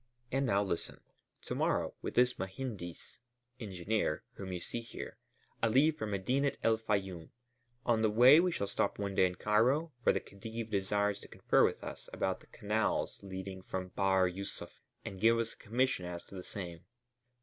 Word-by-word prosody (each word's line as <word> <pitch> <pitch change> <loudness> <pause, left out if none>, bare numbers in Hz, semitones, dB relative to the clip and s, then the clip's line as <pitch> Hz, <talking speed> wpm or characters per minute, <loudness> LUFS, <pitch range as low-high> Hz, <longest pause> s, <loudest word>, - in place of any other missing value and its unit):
And 135 +1 +1
now 100 -2 +3
listen. 95 -4 -3 0.4
To - - -4
morrow, - - +1
with - - -4
this 125 0 +4
mehendis 95 -3 -6 0.4
(engineer) 100 -4 -1
whom 95 -1 -6
you 90 - -3
see 115 +7 -4
here, 115 - -8 0.4
I 115 - +4
leave 140 +7 +4
for 110 - -3
Medinet 125 +8 0
el 110 -1 +3
Fayûm; 95 -6 -2 0.6
on 115 -2 +3
the 110 - +4
way 125 +8 +8
we 180 +1 +3
shall 100 - -1
stop 100 - 0
one 100 -1 -2
day 95 -1 +5
in 90 - -5
Cairo, 125 - +2
for - - +6
the - - 0
Khedive 110 +3 -7
desires 100 +1 +1
to - - -12
confer - - +3
with - - +1
us - - -7
about - - -1
the - - -20
canals 105 +2 -1
leading 95 -1 -6
from 95 0 -4
Bahr 95 0 +3
Yûsuf 95 +2 -5 0.3
and 95 -1 -6
give 115 +1 +6
us 115 -1 -1
a - - -21
commission 120 -5 0
as 85 -1 -5
to - - -17
the 95 - -5
same. 90 -3 -6
100 Hz, 180 wpm, -33 LUFS, 95-115 Hz, 0.6 s, way